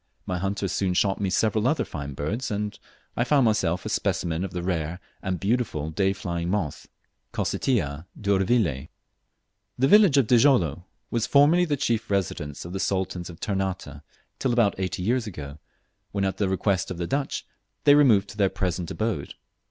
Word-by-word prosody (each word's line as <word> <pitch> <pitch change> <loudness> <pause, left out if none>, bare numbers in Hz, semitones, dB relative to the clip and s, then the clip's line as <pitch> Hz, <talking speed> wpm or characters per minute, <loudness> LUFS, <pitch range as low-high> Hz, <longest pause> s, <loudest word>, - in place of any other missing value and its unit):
My 90 -1 -2
hunters 100 0 -2
soon 90 0 0
shot 95 +1 +1
me 100 - +1
several 110 +3 +1
other 155 +4 +1
fine 70 -2 -6
birds, 100 - -3
and 105 0 -2 0.4
I 125 +5 +3
myself 95 -7 +2
found - - -18
a - - -2
specimen 85 0 -1
of 95 - -3
the 90 0 -5
rare 85 -1 -2 0.2
and 95 -2 -2
beautiful 100 -8 -1
day 95 +4 +1
flying 85 -3 -3
moth, 90 -7 -2 0.5
Cocytia 80 - -1
d'Urvillei. 95 - +1 0.9
The 135 - +3
village 200 -4 +6
of 135 - +5
Djilolo 110 - +3 0.3
was 115 -1 0
formerly 155 +5 +5
the 150 -4 0
chief 115 -3 -1
residence 85 -8 -2
of 85 - -7
the 95 - -3
Sultans 95 -2 -2
of 85 - -11
Ternate, 95 -8 -3 0.4
till 130 - +1
about 115 -4 +3
eighty 95 0 -2
years 120 +3 +1
ago, 75 -6 -8 0.5
when 100 -1 0
at 95 -1 -2
the 100 -2 0
request 95 -1 0
of 90 - -5
the 85 - -2
Dutch 140 +9 -2 0.4
they 145 - +7
removed 120 -9 +5
to 105 - -11
their 100 -2 +3
present 90 -3 -2
abode. 110 -10 -3
95 Hz, 175 wpm, -25 LUFS, 85-115 Hz, 0.9 s, they